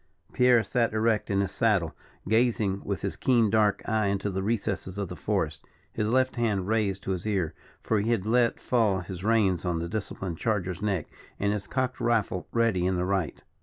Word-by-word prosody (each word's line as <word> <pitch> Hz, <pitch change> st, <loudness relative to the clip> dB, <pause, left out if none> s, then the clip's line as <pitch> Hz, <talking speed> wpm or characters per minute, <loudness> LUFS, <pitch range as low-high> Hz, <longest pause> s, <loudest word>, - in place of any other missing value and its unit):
Pierre 125 Hz, -2 st, +5 dB
sat 120 Hz, -3 st, 0 dB
erect 110 Hz, -1 st, +1 dB
in 100 Hz, -1 st, +2 dB
his 100 Hz, -, -2 dB
saddle; 100 Hz, -9 st, +1 dB, 0.3 s
gazing 110 Hz, -3 st, +1 dB
with 100 Hz, -5 st, -3 dB
his -, -, -2 dB
keen 115 Hz, -5 st, +2 dB
dark 105 Hz, -2 st, +2 dB
eye 110 Hz, -2 st, +1 dB
into 100 Hz, +1 st, -1 dB
the 95 Hz, 0 st, -2 dB
recesses 100 Hz, -3 st, -2 dB
of 100 Hz, -3 st, -3 dB
the -, -, -6 dB
forest, -, -, -2 dB, 0.3 s
his 105 Hz, -, -1 dB
left 130 Hz, +2 st, +1 dB
hand 105 Hz, -6 st, 0 dB
raised 105 Hz, -3 st, 0 dB
to -, -, -2 dB
his 95 Hz, +2 st, -3 dB
ear, 95 Hz, -7 st, 0 dB, 0.3 s
for 110 Hz, -, +1 dB
he 105 Hz, +3 st, -1 dB
had 115 Hz, -5 st, +1 dB
let 120 Hz, +1 st, +2 dB
fall 110 Hz, -6 st, +1 dB
his 90 Hz, 0 st, -7 dB
reins 105 Hz, -6 st, +2 dB
on 90 Hz, -2 st, -1 dB
the 85 Hz, +1 st, -3 dB
disciplined 95 Hz, -4 st, -4 dB
charger's 95 Hz, -6 st, -1 dB
neck, 100 Hz, -7 st, 0 dB, 0.3 s
and 100 Hz, 0 st, +1 dB
his 100 Hz, -2 st, -4 dB
cocked 130 Hz, -1 st, -2 dB
rifle 115 Hz, -6 st, 0 dB
ready 115 Hz, -6 st, +2 dB
in 95 Hz, -, +1 dB
the 90 Hz, 0 st, 0 dB
right. 95 Hz, -6 st, -2 dB
105 Hz, 200 wpm, -27 LUFS, 95-115 Hz, 0.3 s, Pierre